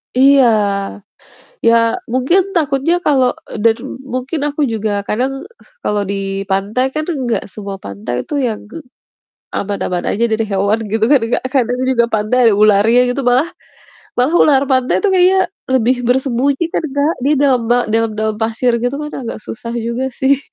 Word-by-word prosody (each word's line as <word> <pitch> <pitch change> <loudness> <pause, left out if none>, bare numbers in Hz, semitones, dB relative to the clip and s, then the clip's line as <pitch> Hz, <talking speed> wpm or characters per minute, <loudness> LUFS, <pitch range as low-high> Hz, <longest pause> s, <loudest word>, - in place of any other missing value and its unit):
Iya, 270 +1 +6 1.2
ya 230 - +6 0.4
mungkin 265 +10 +3
takutnya 295 0 +1
kalau 265 -4 +4 0.3
daru 230 +1 +2 0.3
mungkin 260 +5 -3
aku 290 +1 -5
juga 220 -1 -2 0.2
kadang 255 +5 0 0.5
kalau 210 -1 0
di - - -1 0.4
pantai 200 +6 0
kan 310 - -1
enggak 260 -7 -1
semua 200 -2 -6
pantai 100 +5 -5
itu - - -7
yang 220 -3 -3 1.0
aman-aman 190 -3 -2
aja 230 - 0
dari 220 0 0
hewan 200 +3 +1
gitu 220 0 +2
kan 280 -4 +5
Kak, - - +1
kadang 245 -1 +1
juga 235 -2 +3
pantai 215 +3 0
ada 220 - +5
ularnya 215 +3 +5
gitu 275 - -2
mah. 265 +7 +2 0.7
Malah 255 +7 +1
ular 275 -3 +4
pantai 260 -1 +2
itu 415 - +2
kayaknya 370 +1 +4 0.4
lebih 255 0 +3
bersembunyi 265 +4 +1
kan - - -1
Kak, 290 +3 +1
di 280 - +2
dalam 265 -4 +3
ba 245 - +4 0.2
dalam-dalam 220 -1 0
pasir 230 +2 +1
gitu 245 +2 -1
kan 300 - -5 0.2
agak - - -5
susah 230 +1 -6
juga 235 +2 -2
sih. 270 0 +3
245 Hz, 155 wpm, -16 LUFS, 220-275 Hz, 1.2 s, Iya